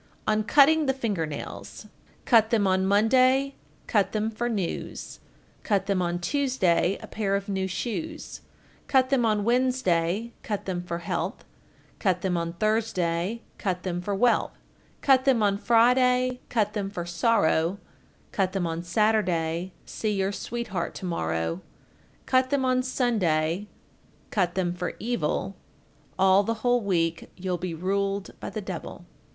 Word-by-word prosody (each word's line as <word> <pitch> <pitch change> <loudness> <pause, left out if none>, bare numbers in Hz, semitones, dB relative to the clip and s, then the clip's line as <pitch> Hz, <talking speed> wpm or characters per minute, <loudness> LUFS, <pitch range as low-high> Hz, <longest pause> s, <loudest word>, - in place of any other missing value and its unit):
On 215 0 +2
cutting 295 +5 +5
the 270 - +2
finger 205 -11 -1
nails: 150 - -8 0.4
Cut 225 -3 +5
them 220 -3 +2
on 190 0 +2
Monday, 255 +7 +4 0.3
cut 200 -4 +1
them 215 +1 0
for 240 +2 -2
news, 200 -7 -4 0.4
Cut 200 -3 0
them 195 -2 0
on 175 0 -1
Tuesday, 195 -4 +1
a - - -5
pair 200 -2 -1
of 200 +1 -3
new 190 -1 -1
shoes, 305 - -5 0.5
Cut 260 -1 +3
them 245 -4 +3
on 210 -1 +1
Wednesday, 235 -4 +1
cut 205 -2 -4
them 180 -2 -2
for 175 -1 -4
health, 170 - -3 0.5
Cut 185 -3 +1
them 185 -2 0
on 170 0 -2
Thursday, 210 -1 0 0.2
cut 185 -3 -2
them 175 -2 -2
for 200 +2 -2
wealth, 240 +4 +2 0.4
Cut 265 -2 +4
them 255 -5 +3
on 200 -1 +2
Friday, 250 +2 +3
cut 210 -3 +1
them 200 -2 -2
for 175 -4 -5
sorrow, 175 -2 +2 0.5
Cut 190 -2 0
them 190 -3 -1
on 165 0 -2
Saturday, 180 -3 +1
see 215 -1 -2
your 195 0 0
sweetheart 210 -4 -4
to - - -6
morrow, 80 - -2 0.6
Cut 255 0 +2
them 275 -1 +1
on 255 0 +2
Sunday, 205 - 0 0.6
cut 180 -5 0
them 180 -2 0
for 180 0 -4
evil, 195 -4 -2 0.6
All 190 +1 +5
the 230 +3 -1
whole 245 0 +3
week 170 -5 -1
you'll 180 -1 -2
be 180 -2 -4
ruled 195 +3 -1
by - - -5
the - - -5
devil. - - -7
200 Hz, 150 wpm, -26 LUFS, 180-235 Hz, 0.6 s, cutting